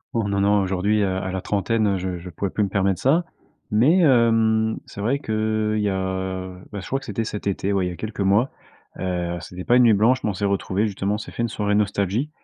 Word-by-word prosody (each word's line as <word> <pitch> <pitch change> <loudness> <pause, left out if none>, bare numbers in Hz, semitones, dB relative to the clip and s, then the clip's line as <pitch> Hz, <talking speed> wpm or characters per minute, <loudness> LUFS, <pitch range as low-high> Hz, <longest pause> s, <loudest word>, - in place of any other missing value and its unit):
Oh, 115 -3 +1
non, 100 0 0
non 100 0 +3
aujourd'hui, 100 +3 +1
heu, 100 - +2
à 95 0 -3
la 95 0 -3
trentaine, 105 +3 0
heu, 100 -1 +1
je 90 -1 -4
je 90 +2 -9
pourrais 95 +3 -3
plus 105 - 0
me 100 - -1
permettre 95 -1 0
ça. 160 +7 +3 0.5
Mais, 125 - +4
hem, 115 -5 +3
c'est 100 - -9
vrai 120 +7 +1
que, 110 -3 -1
il 105 - 0
y 105 - +1
a 95 -1 -3 0.2
bah 105 - -5
je - - -9
crois 135 - -1
que 135 - -13
c'était 115 0 -2
cet 105 -2 -5
été, 100 0 -1
ouais, 95 -2 +1
il - - -2
y - - -5
a - - -7
quelques 110 +3 -7
mois. 100 +6 +2 0.5
Heu, 90 -2 -2
c'était 90 0 -8
pas 120 - +3
une 125 - +6
nuit 115 -2 +6
blanche, 115 +6 +3
mais - - +1
on - - -1
s'est 100 - -1
retrouvés 100 +1 0
justement, 100 0 -1
on - - -3
s'est 105 - -8
fait - - -4
une 115 - 0
soirée 105 -1 -1
nostalgie 105 +5 0
105 Hz, 260 wpm, -23 LUFS, 95-110 Hz, 0.5 s, une